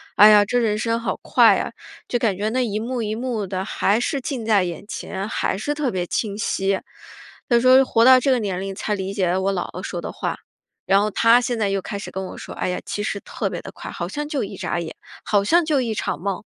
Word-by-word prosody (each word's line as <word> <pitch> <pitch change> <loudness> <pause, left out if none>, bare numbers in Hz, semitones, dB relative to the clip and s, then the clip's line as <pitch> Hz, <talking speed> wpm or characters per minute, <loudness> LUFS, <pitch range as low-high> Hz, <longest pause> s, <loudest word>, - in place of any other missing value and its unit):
哎 210 - +9
呀， 210 -1 +7
这 245 +4 +1
人 215 -3 +1
生 230 +1 0
好 235 - -2
快 - - +5
呀， - - -2 0.4
就 245 - 0
感 210 -6 +1
觉 210 +2 -1
那 255 +2 0
一 210 -3 -2
幕 240 +2 -3
一 215 -1 -2
幕 230 -4 -3
的， 185 0 -3
还 205 +1 +1
是 270 +2 -1
近 245 -4 -4
在 210 -4 +4
眼 175 +2 -5
前， 195 -1 -5
还 190 - -1
是 290 +8 -2
特 290 -3 -1
别 180 -5 -2
清 205 +2 -2
晰。 195 -2 0 0.7
她 240 -1 +5
说， 255 +2 +6
活 230 -2 +3
到 260 0 +8
这 275 - 0
个 255 - +4
年 195 -4 -2
龄 195 0 -5
才 210 +1 -2
理 190 -1 -3
解 195 -3 0
了 180 +2 +1
我 195 +1 +1
姥 180 -2 -3
姥 - - -6
说 - - -5
的 - - -5
话。 - - -3 0.5
然 195 +1 +4
后 210 - +1
她 230 +3 +5
现 240 -1 -2
在 210 - +1
又 195 -1 -1
开 200 - -5
始 200 - -7
跟 190 0 -4
我 - - -9
说， - - -8
哎 - - -2
呀， 180 - -2
其 205 - -3
实 205 -1 -2
特 - - -4
别 - - -5
地 - - -9
快， - - -9
好 - - -4
像 295 0 -4
就 285 -6 -1
一 195 - -6
眨 175 - -2
眼， 165 -2 -6 0.3
好 205 -2 +2
像 340 +10 +3
就 295 -4 +2
一 230 -3 -2
场 150 - -2
梦。 195 0 -3
215 Hz, 280 characters per minute, -22 LUFS, 195-245 Hz, 0.7 s, 哎